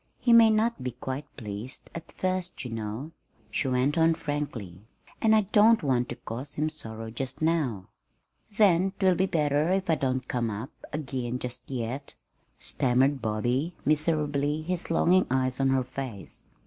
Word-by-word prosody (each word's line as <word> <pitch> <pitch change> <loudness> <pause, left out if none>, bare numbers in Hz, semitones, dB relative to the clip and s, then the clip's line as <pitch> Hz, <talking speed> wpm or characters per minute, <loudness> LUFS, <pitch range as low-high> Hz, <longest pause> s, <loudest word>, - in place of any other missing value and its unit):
"He 240 - +3
may 230 -1 +8
not 220 - +1
be 125 -1 -3
quite 130 +4 -5
pleased 110 +1 -7
at 165 - -8
first, 185 -5 -2
you 125 - -5
know," 115 +7 -4 0.4
she 135 - 0
went 130 +4 +1
on 165 0 +4
frankly; 125 - -4 0.4
"and 220 0 +5
I 215 - +5
don't 220 0 +6
want 125 -3 +1
to 120 - -4
cause 130 +6 -7
him 155 +1 0
sorrow 115 -7 -7
just 130 +3 -5
now." 150 - 0 0.7
"Then 190 -2 +4
'twill 190 -2 +4
be 190 +2 +1
better 150 0 +1
if 190 -2 +1
I - - +4
don't 130 -2 -1
come 120 -2 -1
up 110 +7 -5 0.2
again 130 -4 -3
just 125 -1 -7
yet," 130 +2 -4 0.4
stammered 130 +2 +2
Bobby, 120 +9 -1
miserably, 150 -1 +1
his 180 +1 -3
longing 180 +3 +4
eyes 130 0 0
on 135 0 +3
her 130 -1 +2
face. 125 -5 -7
140 Hz, 160 wpm, -28 LUFS, 125-165 Hz, 0.7 s, may